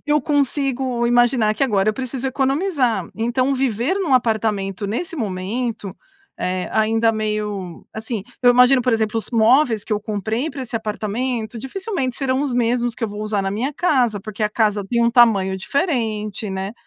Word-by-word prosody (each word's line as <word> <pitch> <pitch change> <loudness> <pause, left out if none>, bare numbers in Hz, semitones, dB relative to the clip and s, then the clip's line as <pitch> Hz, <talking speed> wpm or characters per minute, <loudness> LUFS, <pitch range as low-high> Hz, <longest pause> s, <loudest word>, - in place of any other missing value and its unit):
eu 295 0 +3
consigo 270 -4 0
imaginar 240 -2 +3
que 245 - -2
agora 205 -4 +1
eu 215 - +3
preciso 260 +1 -4
economizar. 270 - 0
Então 255 +4 0
viver 255 - 0
num 360 -9 +1
apartamento 210 -5 0
nesse 335 - -3
momento, 210 - -3 0.5
eh, 185 0 -2
ainda 225 +1 +2
meio 210 -5 -3
assim, 220 -2 -4 0.2
eu 245 - +7
imagino, 250 +1 +5
por 250 -1 +1
exemplo, 220 0 0
os 225 - -6
móveis 230 0 +3
que - - -4
eu 210 - 0
comprei 220 +7 -2
para 275 -2 -6
esse 240 -1 -8
apartamento 225 +2 -3
dificilmente 270 - -3
serão 265 0 0
os 275 -4 -1
mesmos 240 0 +1
que 230 - -3
eu - - -2
vou 210 +1 -6
usar 210 -2 -1
na 195 - -1
minha 245 +9 -2
casa, 250 - +1
porque 215 +1 -6
a 210 - +2
casa 210 -2 +1
tem 235 +4 0
um 235 - +3
tamanho 205 -6 +4
diferente, 220 - -2
né. 190 +2 -4
230 Hz, 175 wpm, -20 LUFS, 210-260 Hz, 0.5 s, eu